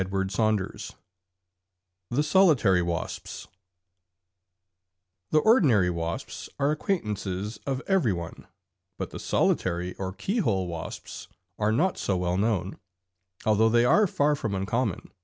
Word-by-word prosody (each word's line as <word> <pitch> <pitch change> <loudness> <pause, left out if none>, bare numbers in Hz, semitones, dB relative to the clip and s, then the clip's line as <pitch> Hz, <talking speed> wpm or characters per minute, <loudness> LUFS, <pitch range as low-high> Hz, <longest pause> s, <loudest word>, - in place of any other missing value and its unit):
THE 140 +5 +1
SOLITARY 150 - +4
WASPS 85 -1 -4 1.8
The - - +2
ordinary 145 - +4
wasps 85 0 -5
are 140 +1 +2
acquaintances 105 - -3
of 135 0 -2
every 190 - +2
one, 85 -2 -6 0.5
but - - -5
the - - -7
solitary 90 0 0
or 95 -1 -3
keyhole 105 - -1
wasps 85 -2 -7 0.3
are 105 0 +2
not 170 +11 +1
so 95 - 0
well 90 0 -1
known, 100 -3 -1 0.7
although 110 +1 +4
they 120 +1 +4
are 210 +11 +5
far 150 -3 +2
from 110 -8 -3
uncommon. 105 +2 -2
110 Hz, 110 wpm, -27 LUFS, 95-145 Hz, 1.8 s, are